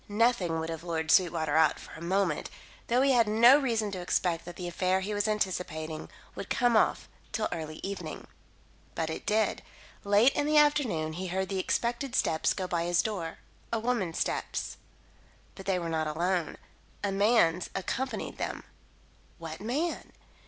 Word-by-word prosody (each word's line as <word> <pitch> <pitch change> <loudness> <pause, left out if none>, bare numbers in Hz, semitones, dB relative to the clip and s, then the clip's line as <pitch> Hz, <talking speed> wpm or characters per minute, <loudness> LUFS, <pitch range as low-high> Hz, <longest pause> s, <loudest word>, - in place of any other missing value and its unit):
Nothing 205 -6 +2
would 160 0 -3
have 165 0 -6
lured 160 -2 -1
Sweetwater 160 -4 +3
out 160 0 +4
for - - -12
a 160 - -10
moment, 180 -2 0 0.4
though 245 +3 +3
he 275 - +4
had 235 -4 +4
no 235 +6 +7
reason 225 -6 0
to 185 -2 -5
expect 175 -1 0
that 175 - -8
the 180 - -5
affair 185 +2 +1
he 205 +2 -3
was 205 +1 0
anticipating 175 -7 -2 0.2
would - - -7
come 245 -2 +2
off 215 - +2 0.2
till - - 0
early 155 -1 -5
evening. 190 -5 -5 0.7
But 160 -1 -1
it - - -7
did. 215 +1 +1 0.4
Late 205 +6 +5
in 290 - 0
the 305 0 +3
afternoon 255 - +3
he 185 +3 -4
heard 190 +1 -2
the 195 -1 -1
expected 240 +6 -1
steps 160 -9 +2
go 185 - -2
by 170 -2 -1
his 175 0 +2
door 180 -7 -4 0.3
a 230 - +1
woman's 220 -7 -1
steps. - - -2 0.8
But 195 - -11
they 190 -2 +2
were 170 -2 -3
not 160 -1 -1
alone. 170 +2 -1 0.5
A 200 - 0
man's 195 -4 +3
accompanied 255 +8 -3
them. - - -3 0.7
What 165 0 -8
man? 285 +11 -2
190 Hz, 170 wpm, -29 LUFS, 165-225 Hz, 0.8 s, no